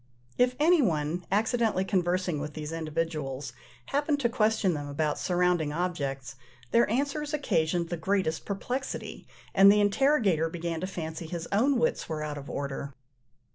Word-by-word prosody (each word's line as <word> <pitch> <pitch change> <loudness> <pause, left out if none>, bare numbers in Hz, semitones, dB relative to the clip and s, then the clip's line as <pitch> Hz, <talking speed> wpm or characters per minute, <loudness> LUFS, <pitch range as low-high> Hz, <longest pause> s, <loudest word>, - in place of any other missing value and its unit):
If 250 0 +3
any 330 +2 +5
one, 165 - 0
accidentally 220 -2 +1
conversing 180 -3 0
with 150 +1 -6
these 155 0 -5
individuals, 155 -5 -3 0.3
happened 290 - 0
to 235 - +2
question 215 -5 +2
them 145 -2 -4
about 150 +1 -1
surrounding 180 -4 +1
objects, 140 -6 -3 0.3
their 235 -2 +4
answers 285 +5 -1
occasioned 170 - 0
the 175 - -2
greatest 165 -1 0
perplexity, 245 +6 -4 0.3
and 195 0 +8
the 210 - +4
interrogator 205 - +3
began 165 -1 -4
to 185 - -2
fancy 160 -3 -5
his 170 0 -5
own 255 +7 +3
wits 240 -6 0
were 155 -1 -3
out 150 -1 -4
of 140 - -10
order. 140 -1 -4
175 Hz, 150 wpm, -28 LUFS, 155-220 Hz, 0.3 s, and